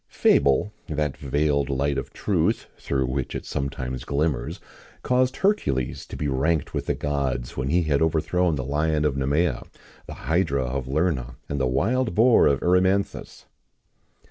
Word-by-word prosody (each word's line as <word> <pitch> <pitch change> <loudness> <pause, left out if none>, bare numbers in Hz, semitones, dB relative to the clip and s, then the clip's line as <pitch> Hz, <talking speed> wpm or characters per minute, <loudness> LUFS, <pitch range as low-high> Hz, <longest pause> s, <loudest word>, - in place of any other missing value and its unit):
[XIX - - -22
3] - - +6
Fable, 70 +10 +3
that 75 -4 -1
veiled 70 +1 0
light 70 +1 0
of 65 - -7
truth, - - 0
through 65 -1 -1
which 65 0 -3
it - - -5
sometimes 65 -2 -4
glimmers, 70 -4 -1 0.4
caused 125 +1 +2
Hercules 70 - 0
to - - -8
be 75 - -2
ranked 75 +3 0
with - - -3
the - - +1
gods 70 -4 -2
when 65 -1 -2
he 85 +5 +2
had 75 -2 +1
overthrown 80 +2 +1
the 65 -3 -4
lion 75 +2 0
of 75 - +2
Nemæa, 70 +1 0 0.4
the - - -7
hydra 80 -5 +1
of 65 0 -3
Lerna, 70 -5 -1
and 70 - -2
the 65 - +2
wild 105 - 0
boar 115 +3 +5
of 70 - +1
Erymanthus. 95 +2 +1
70 Hz, 165 wpm, -24 LUFS, 65-85 Hz, 0.4 s, 3